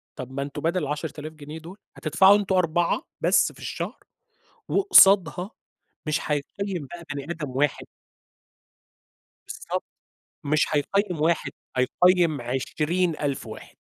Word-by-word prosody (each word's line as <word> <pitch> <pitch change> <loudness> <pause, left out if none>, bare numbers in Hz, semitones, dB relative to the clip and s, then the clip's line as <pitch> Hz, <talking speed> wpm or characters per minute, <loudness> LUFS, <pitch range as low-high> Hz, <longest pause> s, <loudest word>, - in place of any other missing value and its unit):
طب 130 0 -7
ما 140 - -4
أنتم 140 +1 -5
بدل 170 +2 0
ال10.000 150 +1 -5
جنيه 150 +1 -9
دول 175 +5 -11 0.2
هتدفعوا 190 +6 +5
أنتم 195 -2 -1
4 175 -1 +1 0.2
بس - - +3
في - - -18
الشهر، - - -5 0.7
وقصادها 195 - +5 0.6
مش 155 - 0
هيقيّم 170 +2 -3
بقى 170 -1 -8
بني 140 - -4
آدم 150 -5 -5
واحد 140 +3 0 1.6
بالضبط، - - -4 0.6
مش 150 +1 +2
هيقيّم 180 +2 0
واحد، 160 -4 +1 0.3
هيقيّم 170 +3 +3
20.000 150 +4 -1
واحد. - - -11
160 Hz, 115 wpm, -25 LUFS, 145-180 Hz, 1.6 s, هتدفعوا